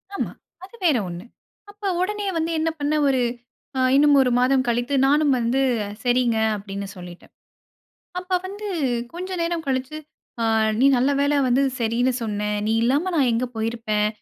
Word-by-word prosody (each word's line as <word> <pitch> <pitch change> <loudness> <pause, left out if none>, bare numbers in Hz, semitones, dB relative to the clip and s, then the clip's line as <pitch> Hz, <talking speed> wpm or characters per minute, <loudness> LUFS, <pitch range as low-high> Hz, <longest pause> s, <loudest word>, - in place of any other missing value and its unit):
ஆமா. - - -2 0.3
அது 390 +5 -12
வேற 295 -7 +4
ஒண்ணு. 175 +3 -7 0.5
அப்போ 410 0 -6
உடனே 415 +2 -2
வந்து 325 +1 -1
என்ன 325 - +1
பண்ணேன்? 295 0 +1
ஒரு 260 -2 +2 0.6
அ - - +1 0.2
இன்னும் 290 0 +5
ஒரு 250 - +2
மாதம் 260 +1 +3
கழித்து, 240 +3 0
நானும் 290 0 +3
வந்து 240 +3 +1 0.4
சரிங்க. 245 -2 +2 0.2
அப்படின்னு 200 0 -6
சொல்லிட்டேன். 175 -1 -12 0.9
அப்ப 365 0 -1
வந்து 410 +2 -7 0.5
கொஞ்சம் 365 +1 -5
நேரம் 335 -1 -2
கழிச்சு, 265 +2 -2 0.5
அ - - +1 0.4
"நீ 270 - +5
நல்ல 255 +3 +2
வேள 285 +1 +2
வந்து 250 +3 +3 0.2
சரின்னு 235 +3 +1
சொன்னேன். 210 -1 -2
நீ 220 - +1
இல்லாம 285 +10 +1
நான் 265 -5 +3
எங்க 235 +2 0
போயிருப்பேன்? 220 -2 -1
260 Hz, 155 wpm, -23 LUFS, 230-315 Hz, 0.9 s, இன்னும்